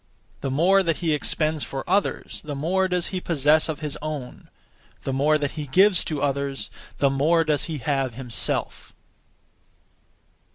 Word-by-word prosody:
The 135 - -3
more 175 +9 +4
that 165 -4 0
he 165 -3 0
expends 155 +1 +1
for 135 -1 -5
others, 200 0 -1
the 150 -2 -6
more 185 +7 +1
does 180 -2 0
he 185 -1 -3
possess 155 -1 +2
of 155 -1 -4
his 150 -1 -4
own; 150 -5 -6 0.5
the 135 - -2
more 150 +3 +3
that 145 -2 -2
he 150 -2 -6
gives 190 +6 +4
to 150 -3 -2
others, 140 -5 -2 0.3
the 140 -1 +2
more 160 +5 +3
does 150 -2 0
he 160 -2 -4
have 135 -2 -1
himself. 125 -2 -2
150 Hz, 160 wpm, -24 LUFS, 140-165 Hz, 0.5 s, more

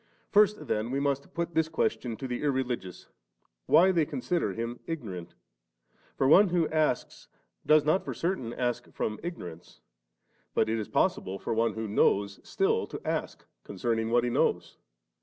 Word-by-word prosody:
First 210 0 +4
then 110 +2 -1
we 135 +2 -1
must 140 -1 -1
put 170 0 -2
this 160 0 +1
question 125 -7 -1
to 135 - -5
the 125 -1 -3
irreligious, 130 -9 -2 0.6
why 185 +3 +6
they 170 -3 +3
consider 175 - -1
Him 115 +3 -4
ignorant? 105 - -6 0.8
for 135 - +2
one 185 +7 +7
wbo 170 -2 +1
asks, 155 -5 -1 0.4
does 155 -1 +5
not 155 +5 +2
for - - -5
certain 170 -10 -2
ask 120 -1 -2
from 105 0 -3
ignorance; 90 - -8 0.8
but 110 - +2
it 115 0 0
is 105 - -4
possible 95 +1 0
for - - -3
one 115 +1 +1
who 110 0 -3
knows, 100 -1 +2
still 445 +4 0
to - - -7
ask - - -3 0.2
concerning 115 -2 -2
what 120 +1 +3
He 120 - 0
knows. - - 0
125 Hz, 160 wpm, -29 LUFS, 110-165 Hz, 0.8 s, one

